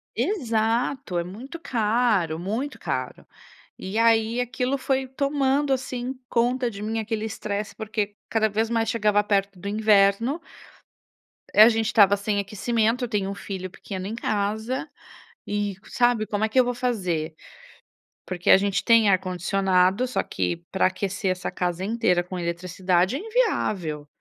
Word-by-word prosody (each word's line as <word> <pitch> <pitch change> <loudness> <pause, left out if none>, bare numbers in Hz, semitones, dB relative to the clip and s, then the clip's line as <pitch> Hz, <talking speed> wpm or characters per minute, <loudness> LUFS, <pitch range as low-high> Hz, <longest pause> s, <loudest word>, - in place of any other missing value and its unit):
Exato, 235 - 0
é - - -1
muito 240 - -9
caro, 215 - +1
muito 225 +11 -3
caro. - - -4 0.5
E 190 +3 -5
aí 230 +1 +3
aquilo 250 +3 -1
foi 265 0 -1
tomando, 275 +1 0
assim, 255 0 -3
conta 245 +1 +1
de 200 -3 -9
mim 220 +2 -2
aquele 220 0 -3
estresse, 215 -1 -4
porque 210 -1 -3
cada 220 -1 +2
vez 220 +2 0
mais 225 -1 0
chegava 210 -2 +2
perto 200 -1 0
do 195 +3 -8
inverno 215 - +3 1.1
a 215 +2 +10
gente 225 -1 0
estava 200 -2 +5
sem 205 0 -1
aquecimento, 225 +4 0
eu - - -8
tenho 200 -3 -1
um 200 - -4
filho 190 -2 -6
pequeno 190 0 -7
em 220 - -4
casa, 220 +6 -2 0.6
e 205 -1 -2
sabe 240 -4 +1
como 210 0 -2
é 220 - +2
que 255 - +2
eu 255 - +5
vou 245 - -1
fazer? 185 -11 -2 0.9
Porque 180 -1 -3
a - - +9
gente 200 0 0
tem 230 -3 +5
ar 185 - +4
condicionado 190 +3 +1
só 255 - 0
que 170 - -2
para 190 - +2
aquecer 195 +1 -2
essa 180 0 -3
casa 180 0 -2
inteira 195 -5 +1
com 180 +1 -7
eletricidade 180 +3 0
é - - -2
inviável, 215 - -1
215 Hz, 155 wpm, -24 LUFS, 195-240 Hz, 1.1 s, a